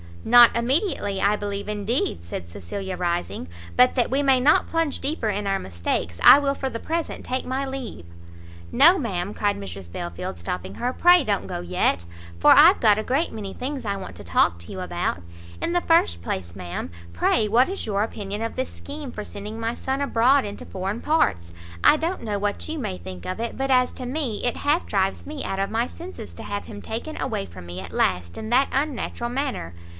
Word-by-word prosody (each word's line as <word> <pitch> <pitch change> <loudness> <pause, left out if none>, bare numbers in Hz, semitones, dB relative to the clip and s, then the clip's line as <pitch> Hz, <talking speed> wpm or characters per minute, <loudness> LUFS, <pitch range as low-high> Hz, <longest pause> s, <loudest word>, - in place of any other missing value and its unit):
"Not 240 -1 +7
immediately, 235 - 0
I 200 +2 +3
believe 200 -1 -4
indeed," 210 - -1
said 85 0 -6
Cecilia, 140 - -5
rising, 175 - -2 0.3
"but 250 0 +5
that 245 -3 +2
we 275 +2 +2
may 270 -2 +4
not 285 +5 +4
plunge 330 -3 0
deeper 275 -5 -1
in 205 0 -2
our 195 0 +1
mistakes, 85 - -3
I - - +11
will 280 -1 +1
for 270 -1 -3
the 230 - -5
present 330 +5 -3
take 255 +1 -2
my 265 +2 -2
leave." 265 - -6 0.7
"No, 340 +6 +7
ma'am," 200 - -2
cried 205 -1 0
Mrs 95 -2 -8
Belfield, 85 +1 -5
stopping 90 +2 -5
her, 245 - -1
"pray 355 +1 +6
don't 205 -5 -1
go 175 -2 -4
yet, 175 - 0 0.3
for - - +6
I've 335 +7 +8
got 215 -2 +5
a - - -2
great 275 +8 0
many 205 -3 -6
things 265 +1 -4
I 200 -2 -1
want 195 -1 -7
to - - -10
talk 85 +1 +2
to 85 - -11
you - - -6
about. 85 - -2 0.4
In 340 - -1
the 350 - +2
first 330 - +3
place, 85 0 -4
ma'am, 85 -1 -5 0.2
pray 210 - +2
what 240 - +4
is 390 - -4
your 200 -1 0
opinion 210 -1 -4
of 230 - -4
this 260 - -2
scheme 285 -2 -7
for 210 - -6
sending 210 +2 -7
my 230 +1 -1
son 265 +3 -3
abroad 265 0 +3
into 205 0 -7
foreign 195 +4 -4
parts? 85 - +1 0.3
I - - +7
don't 330 +1 -2
know 210 -3 -2
what 205 0 -2
you 320 - -3
may 155 - -3
think 90 0 -9
of 185 - -4
it, 235 0 -3
but 270 +1 -1
as 250 -1 +4
to 255 - -6
me, 255 -6 -2
it 245 - 0
half 300 +4 +1
drives 195 -1 0
me 295 -1 -5
out 195 - -3
of 195 - 0
my 230 +2 +1
senses 345 +7 -9
to - - -9
have 205 0 -4
him 210 -2 -9
taken 235 +8 -5
away 100 - -2
from 90 +1 -11
me 90 +1 -6
at 90 -3 -9
last 85 -1 0
in 220 - -5
that 260 +3 +3
unnatural 270 -4 -2
manner. 255 - -3
220 Hz, 210 wpm, -24 LUFS, 180-270 Hz, 0.7 s, I